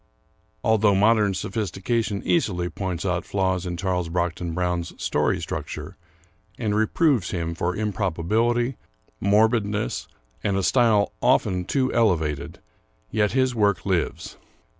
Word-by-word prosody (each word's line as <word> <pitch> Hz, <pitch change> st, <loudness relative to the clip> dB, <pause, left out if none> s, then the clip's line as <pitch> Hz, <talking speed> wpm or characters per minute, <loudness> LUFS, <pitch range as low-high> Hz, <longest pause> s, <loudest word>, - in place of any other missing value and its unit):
Although 110 Hz, -2 st, +3 dB
modern 105 Hz, -1 st, +3 dB
sophistication 105 Hz, +2 st, -2 dB
easily 90 Hz, -, +1 dB
points 95 Hz, -2 st, -4 dB
out 90 Hz, -2 st, 0 dB
flaws 95 Hz, -2 st, -1 dB
in 85 Hz, -1 st, -3 dB
Charles 90 Hz, -2 st, -1 dB
Brockden 85 Hz, -1 st, -2 dB
Brown's 90 Hz, -1 st, -2 dB
story -, -, +1 dB
structure, -, -, -5 dB, 0.6 s
and 110 Hz, -4 st, -1 dB
reproves 110 Hz, -, +2 dB
him 85 Hz, -3 st, -2 dB
for 85 Hz, +2 st, -2 dB
improbability, 110 Hz, +5 st, 0 dB, 0.4 s
morbidness, 105 Hz, +1 st, +1 dB, 0.4 s
and 100 Hz, -1 st, +1 dB
a 95 Hz, -, 0 dB
style 110 Hz, 0 st, +3 dB
often 90 Hz, -1 st, +2 dB
too 130 Hz, +3 st, 0 dB
elevated, 80 Hz, -11 st, +1 dB, 0.5 s
yet 105 Hz, -1 st, +1 dB
his 130 Hz, -1 st, +2 dB
work 100 Hz, -6 st, +1 dB
lives. 90 Hz, -4 st, -2 dB
100 Hz, 120 wpm, -24 LUFS, 90-110 Hz, 0.6 s, Although